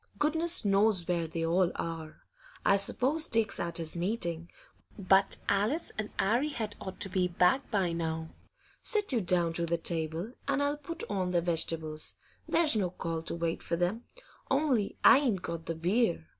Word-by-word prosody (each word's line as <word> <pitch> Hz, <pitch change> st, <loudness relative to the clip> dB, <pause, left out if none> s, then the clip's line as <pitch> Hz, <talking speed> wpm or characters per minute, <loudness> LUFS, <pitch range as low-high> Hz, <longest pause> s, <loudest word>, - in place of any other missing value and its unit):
'Goodness 325 Hz, -1 st, +3 dB
knows 200 Hz, -2 st, +3 dB
where 170 Hz, -2 st, 0 dB
they 165 Hz, +1 st, -3 dB
all 175 Hz, +2 st, +2 dB
are. 165 Hz, -2 st, -6 dB, 0.4 s
I 195 Hz, -, +5 dB
s'pose 265 Hz, +10 st, +1 dB
Dick's 225 Hz, -3 st, +2 dB
at 170 Hz, -1 st, -2 dB
his 165 Hz, -1 st, 0 dB
meeting; 170 Hz, -3 st, -2 dB, 0.5 s
but 195 Hz, 0 st, +3 dB
Alice 215 Hz, +12 st, +1 dB
and 215 Hz, -1 st, -3 dB
'Arry 240 Hz, +9 st, +2 dB
had 220 Hz, -7 st, -4 dB
ought 190 Hz, -1 st, -7 dB
to -, -, +1 dB
be 185 Hz, -1 st, +1 dB
back 180 Hz, +8 st, +2 dB
by 190 Hz, -5 st, 0 dB
now. 160 Hz, -1 st, -3 dB, 0.5 s
Sit 420 Hz, -6 st, 0 dB
you 235 Hz, -, +2 dB
down 175 Hz, -2 st, +1 dB
to 170 Hz, 0 st, -1 dB
the 170 Hz, +1 st, +1 dB
table, 165 Hz, +5 st, -3 dB
and 280 Hz, 0 st, +1 dB
I'll 285 Hz, +1 st, 0 dB
put 305 Hz, +3 st, -6 dB
on 190 Hz, -3 st, -1 dB
the 175 Hz, -1 st, +1 dB
vegetables; 160 Hz, -2 st, -1 dB, 0.3 s
there's 320 Hz, -6 st, +3 dB
no 195 Hz, -4 st, +1 dB
call 165 Hz, -2 st, -4 dB
to 165 Hz, -, -3 dB
wait 170 Hz, -1 st, -2 dB
for -, -, -2 dB
them. 180 Hz, +7 st, -1 dB, 0.4 s
Only 270 Hz, -7 st, +1 dB
I 275 Hz, -, +8 dB
ain't 230 Hz, -10 st, 0 dB
got 165 Hz, -1 st, -5 dB
the 165 Hz, -, -2 dB
beer. 170 Hz, -, 0 dB
185 Hz, 175 wpm, -30 LUFS, 170-230 Hz, 0.5 s, I